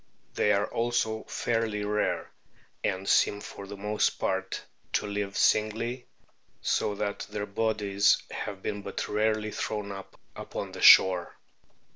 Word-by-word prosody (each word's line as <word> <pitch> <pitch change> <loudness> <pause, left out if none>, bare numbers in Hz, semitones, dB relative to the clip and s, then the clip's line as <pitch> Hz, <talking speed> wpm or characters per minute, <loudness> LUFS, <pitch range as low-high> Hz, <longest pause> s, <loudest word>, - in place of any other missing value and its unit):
They 105 - +2
are 100 0 +2
also 115 -2 -1
fairly 115 -3 -1
rare, 105 0 -1 0.5
and 95 +1 -1
seem 105 - +3
for 100 -1 -9
the 100 0 -8
most 105 +1 +1
part - - -2 0.3
to - - +1
live 100 -1 -3
singly, 115 +4 +1 0.5
so 105 - 0
that 100 0 -3
their 105 -1 -3
bodies 105 -1 +2
have 100 -2 -5
been 105 -1 -3
but 100 - -4
rarely 110 0 0
thrown 105 -1 -3
up 95 -1 -10 0.2
upon - - -6
the - - -8
shore. 90 -2 +7
105 Hz, 135 wpm, -28 LUFS, 100-110 Hz, 0.5 s, shore